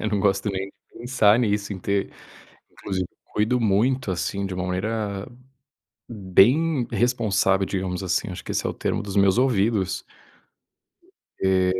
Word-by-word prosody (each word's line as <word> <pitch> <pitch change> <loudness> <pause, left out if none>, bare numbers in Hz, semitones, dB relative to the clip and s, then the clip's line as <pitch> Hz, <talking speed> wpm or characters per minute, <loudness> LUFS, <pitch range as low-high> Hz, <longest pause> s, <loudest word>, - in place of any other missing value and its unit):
Eu 110 - -1
não 100 -2 0
gosto 100 0 +1
nem 95 0 -3
de 95 - -14 0.3
pensar 120 -3 +3
nisso 105 -3 0
em 95 - -6
ter 100 +2 -1 0.6
inclusive 95 -2 -3 0.2
cuido 115 +4 0
muito, 115 +3 +1
assim, 100 +2 -2
de 95 - -5
uma 90 - -3
maneira 100 +2 -3 0.8
bem 120 - +3
responsável, 100 -5 +2
digamos 95 -1 -3
assim, 90 - -1
acho - - -7
que - - -5
esse - - -1
é - - +1
o - - -4
termo, - - -2
dos 100 -1 -6
meus 100 +1 +4
ouvidos. 110 -6 +1 1.4
Eh, 95 -1 +2
100 Hz, 155 wpm, -24 LUFS, 95-115 Hz, 1.4 s, meus